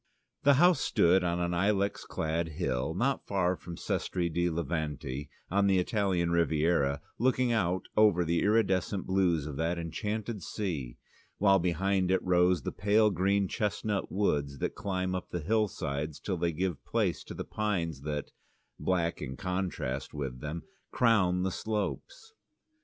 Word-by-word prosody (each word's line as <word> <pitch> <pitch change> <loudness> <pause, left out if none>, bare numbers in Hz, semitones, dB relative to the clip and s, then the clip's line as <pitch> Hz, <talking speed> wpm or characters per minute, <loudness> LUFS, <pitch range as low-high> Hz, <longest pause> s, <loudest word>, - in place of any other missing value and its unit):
The 140 -1 +5
house 175 +5 +5
stood 90 +2 +3
on 85 0 0
an 85 0 0
ilex 100 +2 +1
clad 80 0 -2
hill 70 -1 -1
not 130 +7 0
far 95 -2 +1
from 85 -1 -9
Sestri 85 -3 -2
di 85 +1 +1
Levante 75 -4 -3 0.2
on 100 +1 +3
the 95 -1 +4
Italian 90 -3 +1
Riviera, 80 -4 +2 0.2
looking 125 0 +2
out 95 -5 +1
over 100 -5 +4
the 85 +1 +1
iridescent 100 -3 +1
blues 90 -5 +2
of 75 -3 -6
that 85 +2 0
enchanted 105 +6 -3
sea, 80 - -4 0.4
while 95 -1 +5
behind 90 +2 +1
it 95 0 +3
rose 90 -3 +3
the - - -2
pale 105 +2 +3
green 95 +2 +1
chestnut 105 0 -2
woods 75 -8 0
that - - -2
climb 95 -1 -2
up 90 - -4
the 90 - -3
hillsides 80 -6 -1
till 95 - -2
they 85 0 0
give 85 -1 -2
place - - 0
to - - -8
the - - -5
pines 85 -9 -2
that, 75 0 -4 0.5
black 85 -2 0
in 65 +1 -5
contrast 90 -9 -3
with 65 -4 -4
them, 75 +2 -5 0.3
crown 95 -7 +3
the 95 - 0
slopes. 110 - -4
90 Hz, 150 wpm, -30 LUFS, 80-100 Hz, 0.5 s, The